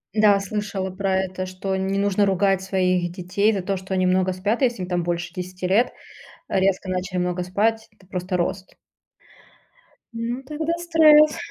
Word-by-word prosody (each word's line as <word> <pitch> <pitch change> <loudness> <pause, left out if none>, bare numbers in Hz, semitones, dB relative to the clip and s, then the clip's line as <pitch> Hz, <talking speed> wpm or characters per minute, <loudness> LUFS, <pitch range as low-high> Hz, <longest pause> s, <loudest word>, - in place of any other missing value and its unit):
Да, 210 -2 +5
слышала 195 -1 -3
про 190 0 -1
это, 185 0 -5
что 185 +1 -4
не 190 +1 -1
нужно 200 0 +2
ругать 195 0 +1
своих 185 -2 0
детей 190 +4 0
за 195 - -1
то, 195 +1 -2
что 190 +1 -6
они 185 -1 +2
много 185 0 +2
спят, 205 +7 -1
если 240 -6 +1
им 180 - -4
там 175 -1 0
больше 175 0 -3
10 180 0 -5
лет. 210 +7 +3 0.6
Резко 190 0 +1
начали 185 0 -2
много 180 0 -1
спать. 220 +5 0
Это 210 -3 -24
просто 180 0 -3
рост. 185 +2 -3 1.4
М, 235 +3 -3
тогда 305 +4 -3
стресс. 310 -3 +5
190 Hz, 165 wpm, -23 LUFS, 185-210 Hz, 1.4 s, Да